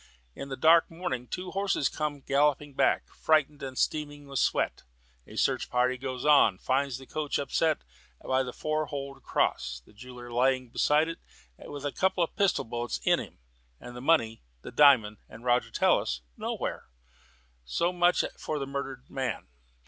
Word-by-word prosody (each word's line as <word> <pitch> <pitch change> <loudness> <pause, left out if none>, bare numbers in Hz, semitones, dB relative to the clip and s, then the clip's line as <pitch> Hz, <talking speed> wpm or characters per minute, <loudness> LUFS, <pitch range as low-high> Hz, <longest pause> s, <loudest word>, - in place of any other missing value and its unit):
In 140 - -8
the 135 - -5
dark 165 +4 +5
morning 135 -8 -4
two 180 +6 -5
horses 195 -7 +1
come 150 -2 -3
galloping 145 +1 +1
back, - - +2
frightened 150 -2 +1
and 130 -2 -6
streaming 145 -1 -1
with 140 -2 -3
sweat. - - +1 0.5
A - - -12
search - - 0
party 125 +1 +2
goes 130 0 -5
out, 140 -10 +5
finds 135 -1 0
the 135 - -12
coach 150 +1 -2
upset 155 +3 0 0.4
by 130 0 0
the 125 -1 -4
Four 155 +3 -2
Holed 140 -1 -6
Cross, - - -1
the - - -20
jeweller 125 +2 -11
lying 130 +1 +1
beside 150 +6 +2
it 165 - -6 0.4
with 145 0 -8
a 145 - -1
couple 190 +1 +1
of 165 - -4
pistol 200 -2 +2
bullets 120 +1 -3
in - - +3
him, - - -9 0.4
and 120 0 -10
the 125 - -7
money, 115 -7 +2 0.2
the - - -8
diamond, 125 -8 +5
and 115 +2 -12
Roger 120 0 +2
Tallis - - +1
nowhere. - - -4 0.8
So 170 - 0
much 175 0 +3 0.2
for 155 - -3
the 140 - -3
murdered 135 -1 -5
man. 130 - -4
140 Hz, 170 wpm, -28 LUFS, 125-150 Hz, 0.8 s, dark